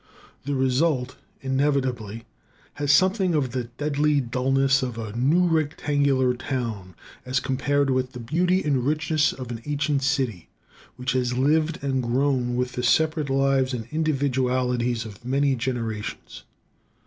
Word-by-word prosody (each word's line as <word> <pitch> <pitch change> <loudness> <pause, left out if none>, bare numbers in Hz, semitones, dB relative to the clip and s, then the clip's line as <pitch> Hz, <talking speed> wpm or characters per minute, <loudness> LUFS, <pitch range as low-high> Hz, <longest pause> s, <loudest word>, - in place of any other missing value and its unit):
The 140 0 -1
result 130 0 +1 0.3
inevitably 130 -5 -1 0.6
has 145 -1 +3
something 185 +3 +3
of 135 -5 0
the 125 -2 -2
deadly 145 +4 0
dullness 135 +2 +1
of 125 -3 -4
a 110 -2 -6
new 150 +9 +3
rectangular 145 -5 +1
town, 115 -8 -4 0.3
as 130 +1 0
compared 135 +2 0
with 130 0 -1
the 125 - -7
beauty 175 +10 +1
and 140 -4 +1
richness 155 +1 +1
of 125 -2 -7
an 115 -1 -6
ancient 145 -1 0
city 130 - -1 0.5
which 125 +1 -2
has 125 -1 0
lived 155 +3 +1
and 135 -2 0
grown 125 0 0
with 125 0 -1
the 125 - -4
separate 155 +4 +2
lives 135 -1 +2
and 115 -2 -6
individualities 130 -5 0
of 105 0 -11
many 135 +2 +1
generations. 115 -4 -4
130 Hz, 135 wpm, -24 LUFS, 125-145 Hz, 0.6 s, has